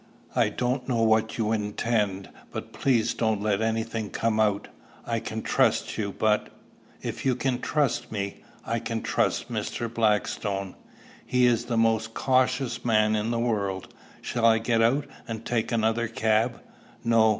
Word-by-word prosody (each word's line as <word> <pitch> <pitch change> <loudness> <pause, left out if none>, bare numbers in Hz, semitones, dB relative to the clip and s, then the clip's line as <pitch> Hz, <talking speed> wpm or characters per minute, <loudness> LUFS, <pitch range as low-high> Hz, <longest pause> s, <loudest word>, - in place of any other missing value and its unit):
I - - +3
don't 125 +1 -2
know 115 -2 +2
what 110 0 +2
you 110 -1 0
intend, 105 -2 -1 0.2
but - - -6
please 125 -5 +2
don't 110 -3 0
let 105 0 0
any 115 0 +1
thing 110 -2 -4
come 110 -1 0
out. 105 -1 +2 0.4
I 115 -1 -1
can 110 -1 -5
trust - - +2
you, 100 -2 -2
but" 105 +1 +1 0.5
"If - - -4
you 130 -2 +2
can 130 0 -1
trust 150 -4 0
me, 100 -2 -4 0.2
I 115 0 -1
can 115 0 -3
trust - - 0
Mr. 115 -1 -3
Blackstone. 105 -3 0 0.5
He 125 -1 +2
is 120 -1 +2
the 120 -1 -1
most 115 0 +2
cautious 130 -1 +1
man 110 -2 +3
in 105 +1 -1
the 120 - 0
world. 100 -5 -1 0.3
Shall 120 -2 -2
I 110 -1 +6
get 115 0 +1
out, 130 +5 +3 0.2
and 115 0 -5
take 115 -2 -1
another 115 0 +1
cab?" 110 +1 +1 0.4
"No. 115 -1 +5
115 Hz, 160 wpm, -26 LUFS, 110-120 Hz, 0.5 s, I